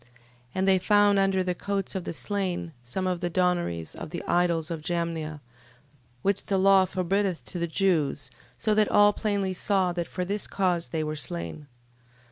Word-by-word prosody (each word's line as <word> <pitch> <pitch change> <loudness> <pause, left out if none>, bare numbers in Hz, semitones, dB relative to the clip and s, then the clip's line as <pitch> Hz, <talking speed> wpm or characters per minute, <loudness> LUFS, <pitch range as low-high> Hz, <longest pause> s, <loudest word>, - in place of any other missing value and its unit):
And 190 +1 +1
they 190 -1 +5
found 205 +1 +4
under 195 -1 +2
the 180 0 -1
coats 195 +1 -3
of 190 -2 -4
the - - -3
slain, 185 -3 -3
some 125 +11 -3
of 180 -1 0
the 175 0 -1
donaries 175 - 0
of - - -7
the - - -5
idols 170 -2 +1
of 165 -2 -4
Jamnia, 160 -2 -2 0.8
which 200 0 0
the 195 - +1
law 190 0 +5
forbiddeth 185 0 -1
to 180 - -6
the 170 - 0
Jews: 160 -7 0 0.3
so 215 - +1
that 210 0 +3
all 205 0 +6
plainly 200 -3 -1
saw, 185 -1 +1
that 170 -1 -3
for 180 - -3
this 200 +3 -1
cause 180 -3 0
they 160 -1 -1
were 155 0 -3
slain. 85 - -6
180 Hz, 180 wpm, -27 LUFS, 165-195 Hz, 0.8 s, all